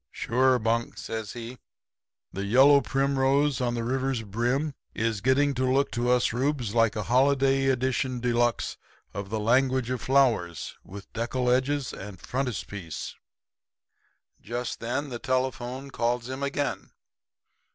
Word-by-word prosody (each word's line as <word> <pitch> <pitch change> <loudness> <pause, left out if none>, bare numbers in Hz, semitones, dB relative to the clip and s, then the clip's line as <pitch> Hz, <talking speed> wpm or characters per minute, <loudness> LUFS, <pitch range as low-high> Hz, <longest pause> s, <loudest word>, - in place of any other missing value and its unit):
"'Sure, 130 +2 +2
Bunk,' 115 0 -1
says 110 -3 -5
he. 120 +1 -8 0.7
'The 100 +1 -3
yellow 135 +6 +6
primrose 135 0 +1
on 120 -1 0
the 115 - -2
river's 130 0 -1
brim 120 +8 -1 0.2
is 115 -2 -1
getting 140 +4 +3
to 130 0 -1
look 135 +2 +2
to 120 +1 -1
us 125 -1 +3
Reubs 125 -3 -1
like 115 -2 +3
a 105 - -2
holiday 135 +2 +3
edition 130 0 0
de 120 0 0
luxe 120 0 0 0.4
of 100 -1 -5
the 110 +1 -2
Language 130 +2 +2
of 125 -3 -2
Flowers 115 - +1
with 100 0 -11
deckle 125 +2 0
edges 130 +2 0
and 95 -1 -8
frontispiece.' 100 - -4 1.3
"Just 120 +2 -4
then 130 +5 -2
the 120 -2 -5
telephone 130 +1 -2
calls 120 0 -1
him 130 +1 -5
again. 140 -7 -2
125 Hz, 140 wpm, -27 LUFS, 115-135 Hz, 1.3 s, yellow